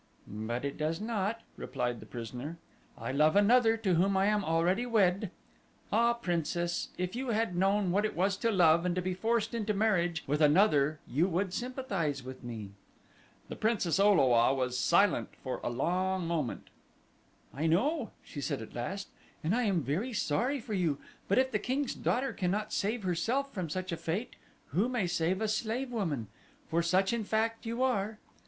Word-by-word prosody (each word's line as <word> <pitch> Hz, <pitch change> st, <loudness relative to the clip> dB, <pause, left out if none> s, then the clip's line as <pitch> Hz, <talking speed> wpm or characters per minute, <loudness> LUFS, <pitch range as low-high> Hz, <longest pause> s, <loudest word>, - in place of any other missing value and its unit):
"But 110 Hz, +5 st, -4 dB
it 140 Hz, -, -4 dB
does 155 Hz, +2 st, -1 dB
not," 220 Hz, 0 st, -2 dB, 0.2 s
replied 120 Hz, -1 st, -3 dB
the -, -, -12 dB
prisoner; 125 Hz, +7 st, -6 dB, 0.4 s
"I -, -, -4 dB
love 150 Hz, +5 st, +3 dB
another 225 Hz, +2 st, +5 dB
to 205 Hz, -5 st, 0 dB
whom 190 Hz, +3 st, +3 dB
I 190 Hz, -, +3 dB
am 210 Hz, 0 st, +2 dB
already 175 Hz, +6 st, +1 dB
wed. 205 Hz, -4 st, +2 dB, 0.6 s
Ah, 235 Hz, +1 st, +4 dB
Princess, 175 Hz, -4 st, -1 dB
if 180 Hz, +3 st, -2 dB
you 260 Hz, +2 st, -3 dB
had 225 Hz, -5 st, 0 dB
known 195 Hz, +1 st, +2 dB
what 200 Hz, +3 st, +2 dB
it 215 Hz, -, -1 dB
was 190 Hz, +3 st, +2 dB
to 230 Hz, -, +1 dB
love 170 Hz, -5 st, +5 dB
and 180 Hz, -1 st, 0 dB
to 185 Hz, -, 0 dB
be 185 Hz, 0 st, -1 dB
forced 225 Hz, +4 st, 0 dB
into 215 Hz, -2 st, -1 dB
marriage 175 Hz, -6 st, +1 dB
with 150 Hz, +3 st, 0 dB
another 150 Hz, -2 st, +4 dB
you 155 Hz, +8 st, +2 dB
would 185 Hz, +1 st, -1 dB
sympathize 200 Hz, -, -2 dB
with 130 Hz, 0 st, -9 dB
me." 110 Hz, -5 st, -6 dB, 0.8 s
The -, -, -6 dB
Princess 205 Hz, -6 st, +1 dB
O 205 Hz, +1 st, +6 dB
lo 130 Hz, -9 st, +4 dB
a 120 Hz, +2 st, +5 dB
was 125 Hz, -1 st, -1 dB
silent 185 Hz, +8 st, +2 dB
for 130 Hz, -, -3 dB
a -, -, -1 dB
long 180 Hz, +8 st, 0 dB
moment. 155 Hz, -8 st, -3 dB, 0.8 s
"I 150 Hz, +5 st, -1 dB
know," 245 Hz, -, +1 dB
she 145 Hz, -, -7 dB
said -, -, -2 dB
at 110 Hz, -, -9 dB
last, 190 Hz, +12 st, -4 dB, 0.4 s
"and 170 Hz, +7 st, +1 dB
I 245 Hz, -1 st, +1 dB
am 185 Hz, -7 st, +1 dB
very 185 Hz, -, -2 dB
sorry 240 Hz, -, 0 dB
for 225 Hz, -2 st, -6 dB
you; 170 Hz, -7 st, +1 dB, 0.3 s
but 200 Hz, -, +2 dB
if 260 Hz, 0 st, +3 dB
the 210 Hz, -, +1 dB
king's 265 Hz, +5 st, -1 dB
daughter 265 Hz, +2 st, -1 dB
cannot 205 Hz, +2 st, -1 dB
save 215 Hz, +2 st, -1 dB
herself 230 Hz, +11 st, 0 dB
from 180 Hz, -5 st, -3 dB
such 185 Hz, +3 st, -3 dB
a 170 Hz, -, -2 dB
fate 195 Hz, +12 st, -3 dB, 0.3 s
who 195 Hz, -, +1 dB
may 245 Hz, -6 st, 0 dB
save 175 Hz, +2 st, 0 dB
a 220 Hz, -, +1 dB
slave 235 Hz, +4 st, -1 dB
woman? 165 Hz, -, -2 dB, 0.4 s
for 165 Hz, +1 st, +1 dB
such 185 Hz, +5 st, +2 dB
in 235 Hz, -2 st, -1 dB
fact 225 Hz, +2 st, -1 dB
you 235 Hz, +3 st, -1 dB
are." 220 Hz, -4 st, 0 dB
190 Hz, 185 wpm, -31 LUFS, 160-220 Hz, 0.8 s, O